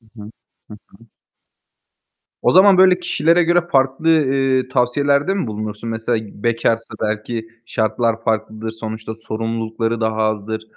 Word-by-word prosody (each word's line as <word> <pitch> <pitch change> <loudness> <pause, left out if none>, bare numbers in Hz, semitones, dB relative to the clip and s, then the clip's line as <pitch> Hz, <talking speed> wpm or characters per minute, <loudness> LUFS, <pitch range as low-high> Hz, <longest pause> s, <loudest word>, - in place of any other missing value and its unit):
Hı 115 - -27 0.2
hı. 105 - -10 0.4
Hı 105 - -9
hı. 115 +4 -21 1.4
O - - +3
zaman 190 +1 +6
böyle 185 -1 +6
kişilere 170 0 +2
göre 175 +1 +3
farklı, 135 +4 +2
eee, 135 -4 +2
tavsiyelerde 140 +6 +1
mi 195 - -2
bulunursun? 110 +1 -5
Mesela 115 +1 -1 0.2
bekarsa 115 -1 0
belki 110 +1 -3 0.2
şartlar 115 +1 -1
farklıdır, 110 0 -2
sonuçta 110 0 -6
sorumlulukları 115 +1 -3
daha 110 -1 -1
azdır 110 0 -2
115 Hz, 130 wpm, -19 LUFS, 110-135 Hz, 1.4 s, zaman